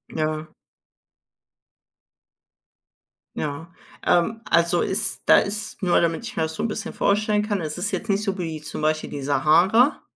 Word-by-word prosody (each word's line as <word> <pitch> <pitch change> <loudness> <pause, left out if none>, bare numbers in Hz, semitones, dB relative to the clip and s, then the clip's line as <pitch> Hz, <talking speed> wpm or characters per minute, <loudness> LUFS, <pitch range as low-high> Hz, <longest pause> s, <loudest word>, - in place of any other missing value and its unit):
Ja. 155 0 -2 2.9
Ja. 150 +3 -5 0.3
Ähm, 220 +6 +2
also 170 +1 +3
ist 195 +3 -1
da - - +7
ist 210 +2 -4
nur 175 -1 +3
damit 165 +5 0
ich - - -7
mir 160 - 0
das 160 0 -3
so - - -3
'n - - +1
bisschen 220 +1 -5
vorstellen 210 +1 +1
kann, 205 -4 -1
es 155 0 -4
ist 205 +3 -2
jetzt 195 +3 -4
nicht 200 +1 +1
so 195 -2 -2
wie 160 -3 -4
zum 155 - -6
Beispiel 155 0 0
die 140 - -6
Sahara? 175 - +3
175 Hz, 160 wpm, -23 LUFS, 155-210 Hz, 2.9 s, da